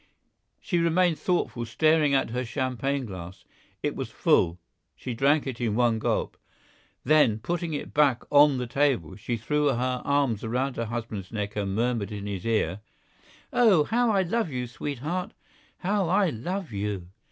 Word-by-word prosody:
She 175 Hz, -, -1 dB
remained 170 Hz, 0 st, +2 dB
thoughtful, 175 Hz, -9 st, -1 dB
staring 155 Hz, +3 st, +3 dB
at 135 Hz, -, +1 dB
her 125 Hz, +2 st, -1 dB
champagne 130 Hz, +2 st, -2 dB
glass. 95 Hz, -3 st, -9 dB, 0.4 s
It -, -, -1 dB
was -, -, -4 dB
full 85 Hz, +1 st, +2 dB, 0.4 s
—she 125 Hz, -, -5 dB
drank 140 Hz, +5 st, +2 dB
it 130 Hz, -3 st, -5 dB
in 110 Hz, -3 st, 0 dB
one 120 Hz, -2 st, +2 dB
gulp; -, -, -1 dB, 0.7 s
then 150 Hz, -8 st, +4 dB
putting 170 Hz, +7 st, -3 dB
it 145 Hz, -, -6 dB
back 145 Hz, -5 st, +3 dB
on 145 Hz, -1 st, +6 dB
the 125 Hz, -, -2 dB
table, 125 Hz, -, 0 dB
she 115 Hz, +3 st, -3 dB
threw 150 Hz, +7 st, 0 dB
her 125 Hz, -1 st, 0 dB
arms 140 Hz, -7 st, +1 dB
around 125 Hz, +4 st, -1 dB
her 115 Hz, -, -1 dB
husband's 110 Hz, -4 st, -5 dB
neck 105 Hz, -2 st, -4 dB
and 100 Hz, -2 st, -2 dB
murmured 115 Hz, -3 st, 0 dB
in 100 Hz, -1 st, -5 dB
his 100 Hz, -1 st, -4 dB
ear: 105 Hz, -5 st, 0 dB, 0.7 s
"Oh! 210 Hz, -10 st, +5 dB
how 240 Hz, +8 st, +1 dB
I 195 Hz, -3 st, +3 dB
love 220 Hz, +1 st, -1 dB
you, 125 Hz, -3 st, -3 dB
sweetheart! 145 Hz, +8 st, -4 dB, 0.4 s
how 195 Hz, -1 st, 0 dB
I 190 Hz, -2 st, +3 dB
love 175 Hz, -, -4 dB
you!" 100 Hz, -3 st, -3 dB
130 Hz, 165 wpm, -26 LUFS, 110-155 Hz, 0.7 s, on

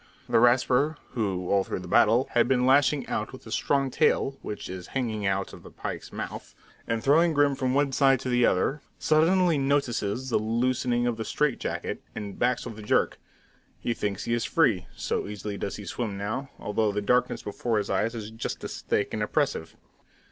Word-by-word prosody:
The -, -, +3 dB
Rasper, 125 Hz, +5 st, +3 dB
who, 95 Hz, -6 st, -2 dB
all 100 Hz, -1 st, +4 dB
through 95 Hz, -, -4 dB
the 90 Hz, -, -9 dB
battle, 115 Hz, +8 st, +4 dB
has 120 Hz, -1 st, +3 dB
been 125 Hz, -1 st, +2 dB
lashing 140 Hz, +1 st, +4 dB
out -, -, -2 dB
with -, -, -11 dB
his -, -, -7 dB
strong 135 Hz, -2 st, +1 dB
tail, 145 Hz, -2 st, +2 dB
which 105 Hz, -, -6 dB
is 90 Hz, -1 st, -7 dB
hanging 110 Hz, -6 st, -1 dB
out 95 Hz, 0 st, -1 dB
of -, -, -11 dB
the -, -, -12 dB
pike's -, -, -6 dB
mouth, -, -, -7 dB, 0.3 s
and 115 Hz, -1 st, -1 dB
throwing 160 Hz, +5 st, +4 dB
Grim 145 Hz, -1 st, +3 dB
from 130 Hz, -1 st, -1 dB
one 140 Hz, -1 st, +2 dB
side 135 Hz, 0 st, +4 dB
to 130 Hz, -, -3 dB
the 125 Hz, 0 st, +3 dB
other, 135 Hz, +9 st, +2 dB, 0.2 s
suddenly 165 Hz, +1 st, +3 dB
notices 130 Hz, -3 st, 0 dB
the -, -, +3 dB
loosening 120 Hz, +2 st, 0 dB
of 120 Hz, -2 st, 0 dB
the 110 Hz, -, -3 dB
strait 150 Hz, +2 st, 0 dB
jacket, -, -, -4 dB
and 105 Hz, -2 st, -6 dB
backs 125 Hz, +1 st, +1 dB
with 115 Hz, -3 st, -7 dB
a -, -, -7 dB
jerk. 105 Hz, -, +1 dB, 0.6 s
He 120 Hz, -, -1 dB
thinks 100 Hz, -4 st, -3 dB
he 115 Hz, -, -1 dB
is 120 Hz, -, 0 dB
free, 115 Hz, -, +2 dB
so -, -, -2 dB
easily 105 Hz, 0 st, -5 dB
does 100 Hz, -, -4 dB
he 105 Hz, -, -8 dB
swim 105 Hz, +1 st, -3 dB
now, 110 Hz, +7 st, -3 dB
although 105 Hz, +1 st, 0 dB
the 105 Hz, +1 st, -2 dB
darkness 125 Hz, +4 st, +1 dB
before 110 Hz, +2 st, -1 dB
his 100 Hz, -1 st, -1 dB
eyes 110 Hz, +5 st, 0 dB
is 110 Hz, -1 st, -6 dB
just 115 Hz, -, -5 dB
as -, -, -6 dB
thick -, -, -1 dB
and -, -, -2 dB
oppressive. -, -, -1 dB
120 Hz, 200 wpm, -27 LUFS, 105-135 Hz, 0.6 s, all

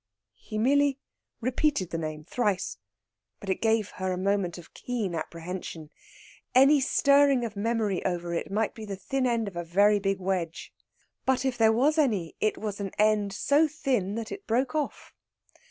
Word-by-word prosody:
He 215 Hz, -, -6 dB
merely 280 Hz, +4 st, +3 dB, 0.4 s
repeated 255 Hz, -, 0 dB
the 165 Hz, -, -2 dB
name 155 Hz, -1 st, -5 dB
thrice, 205 Hz, -2 st, -1 dB, 0.6 s
but 195 Hz, -, -3 dB
it -, -, -2 dB
gave 220 Hz, -2 st, +1 dB
her 185 Hz, 0 st, 0 dB
a 180 Hz, -, -2 dB
moment 190 Hz, -2 st, 0 dB
of 175 Hz, -, -13 dB
keen 225 Hz, -7 st, -3 dB
apprehension. 165 Hz, -1 st, -6 dB, 0.6 s
Any 275 Hz, +3 st, +7 dB
stirring 280 Hz, -1 st, +4 dB
of 220 Hz, -2 st, -6 dB
memory 215 Hz, -2 st, -1 dB
over 175 Hz, -2 st, -2 dB
it 170 Hz, -, -3 dB
might 210 Hz, +2 st, 0 dB
be 220 Hz, -, -9 dB
the 200 Hz, -2 st, -5 dB
thin 255 Hz, +7 st, -1 dB
end 230 Hz, -3 st, 0 dB
of 195 Hz, -, -7 dB
a 175 Hz, -, -3 dB
very 200 Hz, +5 st, +3 dB
big 195 Hz, -1 st, -1 dB
wedge. 180 Hz, -3 st, -3 dB, 0.5 s
But 265 Hz, 0 st, +1 dB
if 260 Hz, -2 st, 0 dB
there 225 Hz, -2 st, +4 dB
was 285 Hz, +8 st, +2 dB
any, 210 Hz, -, +1 dB
it 215 Hz, -, +1 dB
was 210 Hz, -2 st, -4 dB
an 200 Hz, -1 st, -3 dB
end 210 Hz, -1 st, +3 dB
so 285 Hz, +10 st, +3 dB
thin 255 Hz, -, -1 dB
that 225 Hz, -1 st, -5 dB
it 400 Hz, -, -8 dB
broke 250 Hz, +3 st, +1 dB
off. 305 Hz, -2 st, -3 dB
215 Hz, 175 wpm, -27 LUFS, 185-255 Hz, 0.6 s, Any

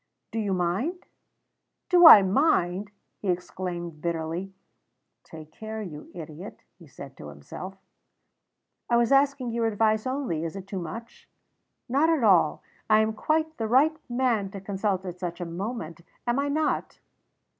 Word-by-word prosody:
"Do 225 Hz, -, -2 dB
you 205 Hz, -3 st, -1 dB
mind?" 190 Hz, -, -1 dB, 0.8 s
"Do 355 Hz, -2 st, +8 dB
I 210 Hz, -11 st, +11 dB
mind!" 195 Hz, -, +1 dB, 0.3 s
he 205 Hz, -, -6 dB
exclaimed 175 Hz, -2 st, -4 dB
bitterly. 170 Hz, +3 st, -3 dB, 0.7 s
("Take 155 Hz, -1 st, -12 dB
care, 220 Hz, +2 st, -6 dB
you 150 Hz, -6 st, -9 dB
idiot!" 165 Hz, +3 st, -9 dB, 0.2 s
he 170 Hz, -, -15 dB
said 135 Hz, 0 st, -11 dB
to -, -, -9 dB
himself.) 75 Hz, -, -9 dB, 1.1 s
"I 235 Hz, -, +4 dB
was 235 Hz, +1 st, +2 dB
asking 275 Hz, -3 st, +3 dB
your 230 Hz, 0 st, 0 dB
advice 220 Hz, +1 st, +1 dB
only. 255 Hz, -, -2 dB
Is 165 Hz, +2 st, -4 dB
it 195 Hz, -1 st, -7 dB
too 195 Hz, -1 st, -5 dB
much?" 230 Hz, +7 st, -9 dB, 0.6 s
"Not 280 Hz, +6 st, +2 dB
at 320 Hz, -6 st, +2 dB
all. 180 Hz, -7 st, +4 dB, 0.3 s
I 215 Hz, 0 st, +6 dB
am 220 Hz, 0 st, 0 dB
quite 315 Hz, +7 st, -1 dB
the 225 Hz, -, -2 dB
right 280 Hz, +7 st, +4 dB
man 240 Hz, -5 st, 0 dB
to 195 Hz, 0 st, -8 dB
consult 195 Hz, -1 st, -2 dB
at 180 Hz, -1 st, -7 dB
such 175 Hz, -1 st, -4 dB
a 175 Hz, -, -3 dB
moment, 170 Hz, -1 st, -5 dB, 0.2 s
am 240 Hz, +2 st, +1 dB
I 285 Hz, +1 st, 0 dB
not?" 305 Hz, +2 st, -1 dB
200 Hz, 155 wpm, -26 LUFS, 175-240 Hz, 1.1 s, I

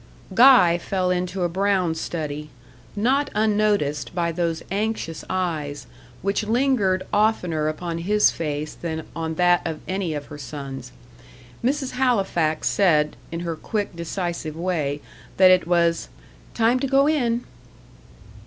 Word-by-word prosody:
Guy 225 Hz, -7 st, +7 dB
fell 185 Hz, 0 st, -1 dB
into 180 Hz, +1 st, -1 dB
a -, -, +3 dB
brown 185 Hz, -1 st, +1 dB
study, 150 Hz, -2 st, -4 dB, 0.5 s
not 260 Hz, +7 st, +1 dB
unnoticed 205 Hz, -9 st, +1 dB
by 170 Hz, -1 st, 0 dB
those 165 Hz, -1 st, -2 dB
anxious 200 Hz, -6 st, -2 dB
eyes, 160 Hz, -6 st, -2 dB, 0.4 s
which 200 Hz, +2 st, 0 dB
lingered 220 Hz, -5 st, +1 dB
oftener 180 Hz, -8 st, +1 dB
upon 165 Hz, +2 st, -3 dB
his 210 Hz, +5 st, +3 dB
face 150 Hz, -1 st, -4 dB
than 160 Hz, -2 st, -5 dB
on 160 Hz, -1 st, -3 dB
that 175 Hz, +1 st, +4 dB
of 160 Hz, -2 st, -4 dB
any 185 Hz, -4 st, -2 dB
of 145 Hz, -1 st, -5 dB
her 150 Hz, 0 st, -10 dB
sons. 135 Hz, -1 st, -7 dB, 0.7 s
Mrs. 265 Hz, +1 st, 0 dB
Halifax 195 Hz, -11 st, +1 dB
said, 155 Hz, -6 st, +3 dB, 0.2 s
in 165 Hz, 0 st, -4 dB
her 170 Hz, -2 st, -3 dB
quick, 205 Hz, +3 st, -3 dB
decisive 170 Hz, -2 st, -4 dB
way, 160 Hz, -5 st, -2 dB, 0.4 s
that 185 Hz, -1 st, +7 dB
it 180 Hz, -2 st, +3 dB
was 170 Hz, -1 st, +2 dB, 0.5 s
"time 235 Hz, +2 st, +3 dB
to 275 Hz, -, -1 dB
go 275 Hz, +1 st, +4 dB
in." 245 Hz, -6 st, +1 dB
175 Hz, 135 wpm, -23 LUFS, 160-210 Hz, 0.7 s, Guy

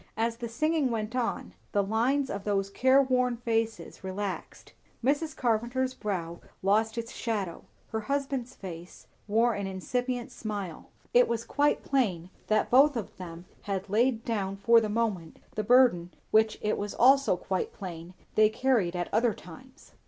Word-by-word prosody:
As 230 Hz, +1 st, 0 dB
the 235 Hz, -1 st, -5 dB
singing 305 Hz, +3 st, +1 dB
went 225 Hz, 0 st, -3 dB
on, 245 Hz, -2 st, -2 dB, 0.2 s
the 205 Hz, -, +3 dB
lines 245 Hz, +7 st, +1 dB
of 200 Hz, 0 st, -4 dB
those 195 Hz, -1 st, 0 dB
careworn 255 Hz, -1 st, +3 dB
faces 225 Hz, -3 st, -2 dB
relaxed; 190 Hz, +1 st, -5 dB, 0.3 s
Mrs. 295 Hz, +3 st, 0 dB
Carpenter's 245 Hz, +2 st, 0 dB
brow 175 Hz, -8 st, -4 dB, 0.2 s
lost 220 Hz, +3 st, +2 dB
its 230 Hz, 0 st, -4 dB
shadow, 205 Hz, -7 st, -3 dB, 0.3 s
her 220 Hz, -, -1 dB
husband's 270 Hz, 0 st, -2 dB
face 175 Hz, -2 st, -9 dB, 0.2 s
wore 230 Hz, +3 st, +3 dB
an 200 Hz, -1 st, -3 dB
incipient 245 Hz, +6 st, -3 dB
smile; 205 Hz, -8 st, -6 dB, 0.2 s
it 245 Hz, 0 st, +6 dB
was 230 Hz, -1 st, -2 dB
quite 290 Hz, +1 st, +1 dB
plain 190 Hz, -11 st, 0 dB, 0.2 s
that 215 Hz, -, +1 dB
both 275 Hz, +2 st, +6 dB
of 220 Hz, -, -5 dB
them 175 Hz, -1 st, -8 dB, 0.2 s
had 195 Hz, 0 st, -2 dB
laid 230 Hz, +1 st, +2 dB
down 200 Hz, -4 st, -1 dB
for 230 Hz, +3 st, +5 dB
the 215 Hz, -, -2 dB
moment 210 Hz, -7 st, -2 dB, 0.2 s
the 215 Hz, -, -2 dB
burden 230 Hz, -7 st, +4 dB, 0.2 s
which 220 Hz, 0 st, +4 dB
it 215 Hz, -, 0 dB
was 205 Hz, 0 st, -4 dB
also 270 Hz, -5 st, +5 dB
quite 185 Hz, 0 st, -2 dB
plain 175 Hz, -1 st, -8 dB, 0.2 s
they 215 Hz, 0 st, +5 dB
carried 220 Hz, -7 st, +1 dB
at 175 Hz, 0 st, -3 dB
other 230 Hz, -1 st, +2 dB
times. 255 Hz, -, -14 dB
225 Hz, 155 wpm, -28 LUFS, 195-250 Hz, 0.3 s, it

